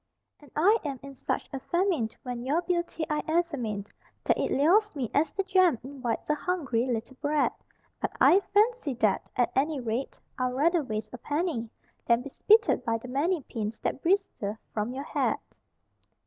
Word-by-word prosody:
And 290 Hz, -, -17 dB
I 405 Hz, +9 st, +5 dB
am 280 Hz, -4 st, -4 dB
in 275 Hz, 0 st, -8 dB
such 265 Hz, -, -3 dB
a 270 Hz, -, -2 dB
famine 345 Hz, -, +1 dB
when 245 Hz, -2 st, -4 dB
your 300 Hz, +7 st, +1 dB
beauty 345 Hz, -2 st, -1 dB
I 300 Hz, 0 st, 0 dB
examine 285 Hz, -, -1 dB, 0.4 s
That -, -, +3 dB
it -, -, 0 dB
lures 365 Hz, +8 st, +3 dB
me 255 Hz, -6 st, -3 dB
as 305 Hz, +3 st, +2 dB
the 390 Hz, -, -1 dB
jam 370 Hz, -7 st, +4 dB
invites 260 Hz, -3 st, -4 dB
a 300 Hz, -, +3 dB
hungry 285 Hz, -7 st, -1 dB
little 240 Hz, +1 st, -3 dB
brat; 295 Hz, 0 st, +2 dB, 0.5 s
But -, -, -2 dB
I 375 Hz, -, +7 dB
fancy 415 Hz, -, +2 dB
that, 215 Hz, -4 st, +1 dB
at 245 Hz, -, +2 dB
any 290 Hz, +2 st, +1 dB
rate, 240 Hz, +2 st, -3 dB, 0.2 s
I'd 255 Hz, 0 st, 0 dB
rather 335 Hz, +5 st, +3 dB
waste 220 Hz, -5 st, -4 dB
a 245 Hz, -, -7 dB
penny 290 Hz, -5 st, -2 dB, 0.4 s
Than 235 Hz, +1 st, +3 dB
be 280 Hz, -, -8 dB
spitted 435 Hz, -, +4 dB
by 230 Hz, -2 st, 0 dB
the 245 Hz, +2 st, -10 dB
many 300 Hz, +5 st, 0 dB
pins 220 Hz, -2 st, -4 dB
that -, -, -2 dB
bristle 330 Hz, -, 0 dB, 0.2 s
from 215 Hz, +2 st, -1 dB
your 265 Hz, +2 st, -4 dB
hat. -, -, 0 dB
280 Hz, 175 wpm, -28 LUFS, 245-345 Hz, 0.5 s, I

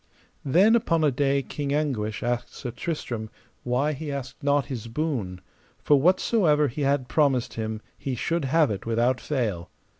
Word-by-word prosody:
Then 190 Hz, -, +5 dB
upon 165 Hz, -9 st, +2 dB
a 150 Hz, -, +4 dB
day 140 Hz, +1 st, +1 dB
King 140 Hz, 0 st, -3 dB
Anguish 110 Hz, -9 st, -1 dB
asked 120 Hz, 0 st, -2 dB
Sir 125 Hz, -, -5 dB
Tristram 120 Hz, -6 st, -4 dB, 0.3 s
why 130 Hz, +5 st, 0 dB
he 150 Hz, +1 st, -5 dB
asked 135 Hz, -3 st, -6 dB
not 145 Hz, 0 st, +2 dB
his 120 Hz, -5 st, -6 dB
boon, 115 Hz, -, -3 dB, 0.4 s
for 145 Hz, -2 st, +3 dB
whatsomever 175 Hz, -, +3 dB
he 135 Hz, +5 st, -5 dB
had 140 Hz, -2 st, +1 dB
promised 135 Hz, -4 st, +1 dB
him 110 Hz, -1 st, -4 dB, 0.2 s
he 135 Hz, -2 st, -3 dB
should 165 Hz, +4 st, -1 dB
have 150 Hz, 0 st, +3 dB
it 100 Hz, +2 st, -5 dB
without 120 Hz, +3 st, +1 dB
fail. 105 Hz, -, -2 dB
135 Hz, 160 wpm, -25 LUFS, 120-150 Hz, 0.4 s, Then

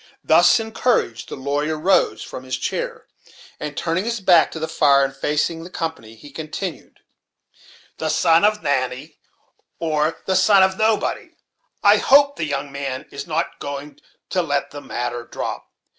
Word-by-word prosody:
Thus 175 Hz, +4 st, +5 dB
encouraged, 220 Hz, -, -1 dB
the -, -, -5 dB
lawyer 145 Hz, +3 st, -2 dB
rose 185 Hz, +5 st, +2 dB
from 130 Hz, -, -8 dB
his 130 Hz, 0 st, -3 dB
chair, -, -, -4 dB, 0.5 s
and 150 Hz, -1 st, -6 dB
turning 170 Hz, +2 st, -1 dB
his 230 Hz, 0 st, -2 dB
back 180 Hz, -4 st, +5 dB
to -, -, -8 dB
the 160 Hz, -, -2 dB
fire, 140 Hz, -3 st, +4 dB
and 135 Hz, 0 st, -6 dB
facing 150 Hz, +4 st, -1 dB
the 175 Hz, -, -9 dB
company, 160 Hz, -11 st, -5 dB
he 145 Hz, +6 st, -14 dB
continued: 160 Hz, +3 st, -7 dB, 1.0 s
"The 160 Hz, -, -1 dB
son 165 Hz, +2 st, +3 dB
of 210 Hz, -1 st, +2 dB
Natty, 135 Hz, 0 st, -2 dB, 0.6 s
or 155 Hz, -1 st, 0 dB
the 190 Hz, -, 0 dB
son 190 Hz, +1 st, +5 dB
of 190 Hz, 0 st, +2 dB
nobody, 220 Hz, +1 st, 0 dB, 0.5 s
I -, -, +6 dB
hope 280 Hz, +1 st, +5 dB
the 160 Hz, -, -2 dB
young 140 Hz, -1 st, -3 dB
man 135 Hz, -2 st, -5 dB
is 140 Hz, 0 st, -7 dB
not 165 Hz, +1 st, -2 dB
going 145 Hz, +1 st, -7 dB, 0.3 s
to 185 Hz, -, +2 dB
let 145 Hz, -4 st, -2 dB
the 145 Hz, -, -8 dB
matter 120 Hz, -2 st, -4 dB
drop. -, -, -6 dB
155 Hz, 160 wpm, -21 LUFS, 140-185 Hz, 1.0 s, I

